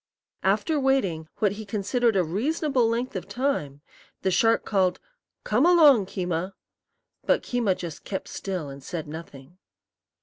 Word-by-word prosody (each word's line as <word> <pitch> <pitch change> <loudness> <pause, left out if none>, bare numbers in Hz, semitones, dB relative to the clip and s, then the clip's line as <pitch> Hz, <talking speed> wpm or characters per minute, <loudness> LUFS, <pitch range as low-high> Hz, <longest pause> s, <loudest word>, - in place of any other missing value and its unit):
After 315 -3 +1
waiting 200 - +1
what 205 -3 +2
he 210 +2 -6
considered 215 +3 0
a 185 - +3
reasonable 250 - 0
length 240 +3 -2
of - - -4
time, 195 - -2 0.4
the 190 - +2
shark 225 +5 +3
called, 185 -3 +1 0.4
"Come 220 +6 +2
along, 300 - +6
Keema!" 180 0 -3 0.7
But - - +3
Keema 230 -7 0
just 165 -4 -7
kept 190 - -5
still 185 -6 -4
and 140 0 -10
said 165 0 -5
nothing. 155 +1 -10
200 Hz, 140 wpm, -26 LUFS, 175-245 Hz, 0.7 s, along